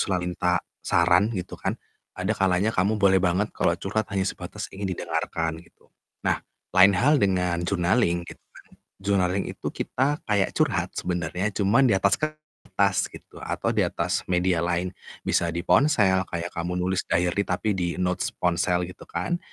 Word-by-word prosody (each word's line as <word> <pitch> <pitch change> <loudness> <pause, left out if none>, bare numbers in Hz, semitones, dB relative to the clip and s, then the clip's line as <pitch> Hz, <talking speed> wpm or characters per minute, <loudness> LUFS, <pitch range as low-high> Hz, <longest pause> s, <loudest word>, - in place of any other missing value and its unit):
selalu 90 -3 0
minta 90 0 0 0.2
saran, 85 +4 +3
gitu 90 -1 -6
kan. - - -1 0.4
Ada 95 +4 0
kalanya 95 +2 +1
kamu 100 +4 +1
boleh 95 -2 +4
banget 95 +4 +1
kalau 85 - +1
curhat 100 +3 -2
hanya 95 -1 +1
sebatas - - -5
ingin 95 0 -4
didengarkan, 80 -1 -2
gitu. 85 - -24 0.3
Nah, - - +1 0.4
lain 95 +1 +8
hal 145 +8 +4
dengan 90 -3 +1
journaling 90 -1 +1
gitu - - -10
kan. - - -19 0.4
Journaling 95 -1 +1
itu - - -9
kita 145 +4 -1
kayak 100 -2 +1
curhat - - 0
sebenernya, 90 +3 -2
cuman 110 +6 +3
di - - +4
atas 100 0 +3
kertas 155 -10 -1
gitu - - -13
atau - - -2
di - - +3
atas - - -1
media 90 -1 +2
lain. 90 +1 -1 0.3
Bisa 85 - +2
di 85 +1 -3
ponsel 95 - +4
kayak 85 0 -4
kamu 90 +1 -2
nulis 90 +1 0
diary 90 +3 +2
tapi 100 +3 0
di 90 -1 -2
notes 90 0 0
ponsel 90 0 +1
gitu 90 - -12
kan, 90 - -2
95 Hz, 165 wpm, -25 LUFS, 90-100 Hz, 0.4 s, lain